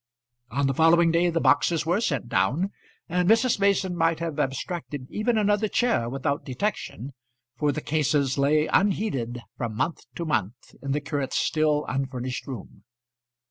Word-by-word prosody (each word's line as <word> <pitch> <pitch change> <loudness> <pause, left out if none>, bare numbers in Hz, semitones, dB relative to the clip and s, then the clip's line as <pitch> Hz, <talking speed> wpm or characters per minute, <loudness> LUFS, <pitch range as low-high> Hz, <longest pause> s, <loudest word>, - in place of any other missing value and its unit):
On 140 +4 0
the 135 - +1
following 165 +3 +5
day 170 +1 +3
the 165 -1 0
boxes 150 +3 +3
were 175 +6 +1
sent 140 - -1
down, 135 - +1 0.4
and 180 +1 +1
Mrs. 230 0 +4
Mason 195 -2 +2
might 165 -1 +1
have 165 -3 -3
abstracted 140 0 -3
even 220 +2 0
another 210 0 +2
chair 225 - +1
without 135 +3 -2
detection, 135 - -4 0.4
for 150 -1 +1
the 155 - -4
cases 145 -3 +1
lay 150 +2 +3
unheeded 135 - 0 0.2
from 115 -3 -3
month 165 - -2
to 170 - -4
month 120 - -2
in 135 0 -2
the 150 - -1
curate's 145 -2 -2
still 155 -1 +1
unfurnished 130 -1 -3
room. 125 -8 -8
150 Hz, 155 wpm, -25 LUFS, 135-175 Hz, 0.4 s, following